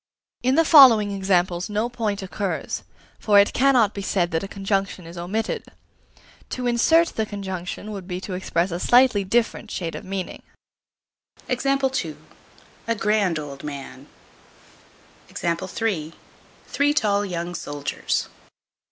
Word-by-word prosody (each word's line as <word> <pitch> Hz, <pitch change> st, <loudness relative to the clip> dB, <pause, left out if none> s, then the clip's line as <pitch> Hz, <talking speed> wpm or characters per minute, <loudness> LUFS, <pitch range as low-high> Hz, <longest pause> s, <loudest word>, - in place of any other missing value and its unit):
In 255 Hz, +2 st, +2 dB
the 330 Hz, +1 st, +4 dB
following 245 Hz, -10 st, +8 dB
examples 185 Hz, -1 st, 0 dB
no 210 Hz, +3 st, 0 dB
point 220 Hz, -5 st, -3 dB
occurs; 190 Hz, 0 st, -3 dB, 0.4 s
for 205 Hz, -2 st, +3 dB
it 200 Hz, 0 st, +5 dB
cannot 250 Hz, -5 st, +4 dB
be 200 Hz, -, -5 dB
said 185 Hz, -3 st, 0 dB
that 160 Hz, 0 st, 0 dB
a 195 Hz, -, -5 dB
conjunction 195 Hz, -2 st, -2 dB
is 165 Hz, +1 st, -10 dB
omitted. 195 Hz, +6 st, -3 dB, 0.9 s
To 250 Hz, -, -4 dB
insert 320 Hz, +8 st, +4 dB
the 220 Hz, -, -2 dB
conjunction 195 Hz, 0 st, -6 dB
would 195 Hz, -3 st, -7 dB
be 180 Hz, -1 st, -4 dB
to 190 Hz, -, -6 dB
express 180 Hz, -1 st, -1 dB
a 170 Hz, -, -3 dB
slightly 245 Hz, -2 st, +4 dB
different 225 Hz, +2 st, 0 dB
shade 170 Hz, -6 st, -4 dB
of -, -, -7 dB
meaning: 190 Hz, -1 st, -5 dB, 1.1 s
A 255 Hz, -, +1 dB, 1.4 s
grand 205 Hz, -5 st, +1 dB
old 145 Hz, -2 st, -7 dB
man. 140 Hz, -2 st, -8 dB, 1.3 s
Three 185 Hz, -, -3 dB
tall 205 Hz, -5 st, +2 dB
young 175 Hz, -2 st, -4 dB
soldiers. 145 Hz, -4 st, -3 dB
195 Hz, 125 wpm, -23 LUFS, 175-225 Hz, 1.4 s, following